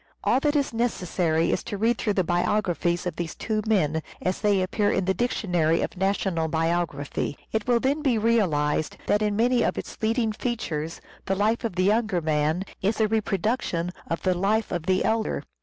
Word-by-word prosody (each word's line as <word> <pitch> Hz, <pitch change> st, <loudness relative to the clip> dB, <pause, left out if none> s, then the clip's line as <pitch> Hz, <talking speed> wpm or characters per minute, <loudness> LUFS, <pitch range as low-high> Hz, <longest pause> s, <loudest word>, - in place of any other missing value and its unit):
All -, -, +3 dB
that 295 Hz, +1 st, +1 dB
is 280 Hz, -4 st, +1 dB
necessary 180 Hz, -8 st, 0 dB
is -, -, -1 dB
to 205 Hz, -, -4 dB
read 225 Hz, +3 st, +1 dB
through 210 Hz, -, 0 dB
the 185 Hz, -, +2 dB
biographies 175 Hz, 0 st, 0 dB
of 175 Hz, -3 st, -3 dB
these 170 Hz, -1 st, -4 dB
two 215 Hz, -1 st, -1 dB
men, 160 Hz, -7 st, +2 dB, 0.2 s
as 185 Hz, +1 st, -2 dB
they 205 Hz, -2 st, +3 dB
appear 205 Hz, +2 st, +1 dB
in 190 Hz, -, +1 dB
the 190 Hz, -, +2 dB
Dictionary 175 Hz, -8 st, +1 dB
of -, -, -4 dB
National 190 Hz, -3 st, 0 dB
Biography. 160 Hz, -3 st, -1 dB
It 220 Hz, 0 st, -1 dB
will 240 Hz, -1 st, +4 dB
then 280 Hz, +5 st, 0 dB
be 265 Hz, -6 st, +2 dB
realized 175 Hz, -10 st, +1 dB
that 210 Hz, -, +2 dB
in 210 Hz, -1 st, +1 dB
many 240 Hz, +2 st, +3 dB
of -, -, 0 dB
its -, -, -6 dB
leading 225 Hz, 0 st, +1 dB
features 170 Hz, -9 st, -3 dB, 0.3 s
the 195 Hz, -, +1 dB
life 215 Hz, +5 st, +1 dB
of 225 Hz, -6 st, -2 dB
the 185 Hz, -, +1 dB
younger 215 Hz, -2 st, +2 dB
man 155 Hz, +2 st, 0 dB, 0.2 s
is 210 Hz, +4 st, 0 dB
a 220 Hz, -, +4 dB
reproduction 205 Hz, -4 st, -1 dB, 0.2 s
of 165 Hz, -, -3 dB
the 185 Hz, -, +3 dB
life 205 Hz, +5 st, 0 dB
of 175 Hz, -1 st, -3 dB
the 185 Hz, 0 st, +2 dB
elder. 220 Hz, 0 st, 0 dB
195 Hz, 190 wpm, -25 LUFS, 170-225 Hz, 0.3 s, will